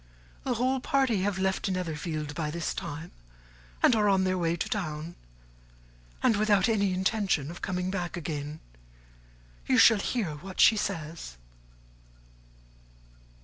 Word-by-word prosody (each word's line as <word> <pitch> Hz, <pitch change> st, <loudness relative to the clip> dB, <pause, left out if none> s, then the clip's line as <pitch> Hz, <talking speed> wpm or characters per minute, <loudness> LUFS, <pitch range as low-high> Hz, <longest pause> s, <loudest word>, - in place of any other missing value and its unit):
The 255 Hz, -2 st, -1 dB
whole 255 Hz, +3 st, +1 dB
party 255 Hz, -6 st, +1 dB
have 200 Hz, -1 st, 0 dB
left 190 Hz, +1 st, 0 dB
Netherfield 160 Hz, -4 st, -3 dB
by 155 Hz, 0 st, -2 dB
this 170 Hz, +1 st, -3 dB
time, 160 Hz, +4 st, -6 dB, 0.7 s
and 245 Hz, -, +6 dB
are 210 Hz, -2 st, +3 dB
on 190 Hz, -1 st, +3 dB
their 185 Hz, 0 st, +1 dB
way 170 Hz, -2 st, 0 dB
to 170 Hz, -, -3 dB
town; 160 Hz, -4 st, -3 dB, 1.1 s
and 220 Hz, -, +4 dB
without 210 Hz, 0 st, +3 dB
any 200 Hz, -4 st, +2 dB
intention 190 Hz, -, 0 dB
of 170 Hz, -, -10 dB
coming 185 Hz, -1 st, -2 dB
back 180 Hz, -2 st, -3 dB
again. 150 Hz, -1 st, -5 dB, 1.1 s
You -, -, +3 dB
shall 225 Hz, -3 st, +7 dB
hear 195 Hz, -9 st, -2 dB
what 185 Hz, +4 st, -10 dB
she 225 Hz, -, +7 dB
says." 155 Hz, -, -4 dB
185 Hz, 135 wpm, -28 LUFS, 160-205 Hz, 1.1 s, shall